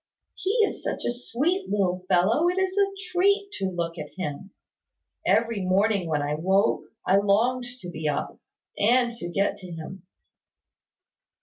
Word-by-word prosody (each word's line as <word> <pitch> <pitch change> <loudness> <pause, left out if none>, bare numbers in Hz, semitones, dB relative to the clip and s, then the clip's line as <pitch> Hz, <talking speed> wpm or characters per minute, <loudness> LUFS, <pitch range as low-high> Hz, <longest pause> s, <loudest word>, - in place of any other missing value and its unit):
"He 380 - -4 0.2
is - - -5
such - - -3
a - - +1
sweet 285 +10 -1
little 185 -3 0
fellow, 205 - +3
it 360 - -2
is 380 0 0
a 400 -1 +3 0.2
treat 400 +3 +2
to 195 - 0
look 170 -2 -3
at 150 -1 -6
him. 185 +1 -4 0.8
Every 230 -2 +2
morning 195 0 +2
when 150 -2 0
I 145 +1 -1
woke, 190 +6 +2 0.2
I 190 - +4
longed 225 +6 +2 0.2
to 180 - -7
be 155 -3 -3
up, 145 - -3 0.4
and 240 +3 +4
to 175 -6 -5
get 195 +3 0
to 185 -2 -10
him." 170 +3 -8
200 Hz, 155 wpm, -26 LUFS, 175-250 Hz, 0.8 s, I